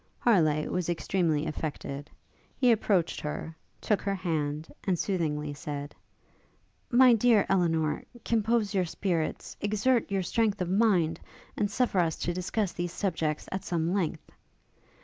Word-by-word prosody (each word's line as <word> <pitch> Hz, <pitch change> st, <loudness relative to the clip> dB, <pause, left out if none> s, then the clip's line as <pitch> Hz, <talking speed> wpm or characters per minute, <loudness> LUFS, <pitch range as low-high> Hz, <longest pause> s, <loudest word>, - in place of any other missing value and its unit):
Harleigh 155 Hz, -10 st, +3 dB
was 180 Hz, -2 st, -2 dB
extremely 170 Hz, -3 st, 0 dB
affected: 145 Hz, -2 st, -5 dB, 0.5 s
he 250 Hz, -2 st, +4 dB
approached 200 Hz, -6 st, +1 dB
her, 150 Hz, +2 st, -5 dB, 0.2 s
took 210 Hz, -, 0 dB
her 200 Hz, -1 st, -1 dB
hand, 155 Hz, -4 st, -2 dB, 0.2 s
and 185 Hz, -3 st, +1 dB
soothingly 150 Hz, -6 st, -1 dB
said, 145 Hz, 0 st, -6 dB, 1.0 s
'My 250 Hz, 0 st, +7 dB
dear 225 Hz, -2 st, +4 dB
Elinor, 165 Hz, -5 st, +1 dB, 0.2 s
compose 225 Hz, -1 st, +1 dB
your 185 Hz, -2 st, +2 dB
spirits, 170 Hz, -1 st, -2 dB
exert 215 Hz, +4 st, +1 dB
your 195 Hz, -1 st, 0 dB
strength 215 Hz, +1 st, +1 dB
of 180 Hz, -1 st, -2 dB
mind, 185 Hz, -6 st, +3 dB, 0.4 s
and 205 Hz, -2 st, 0 dB
suffer 225 Hz, -3 st, +1 dB
us 165 Hz, -2 st, +2 dB
to 175 Hz, -, -2 dB
discuss 185 Hz, +2 st, -1 dB
these 175 Hz, -1 st, -3 dB
subjects 160 Hz, -6 st, -2 dB
at 190 Hz, -1 st, -3 dB
some 170 Hz, 0 st, -1 dB
length.' 185 Hz, -6 st, -2 dB
180 Hz, 135 wpm, -29 LUFS, 160-205 Hz, 1.0 s, My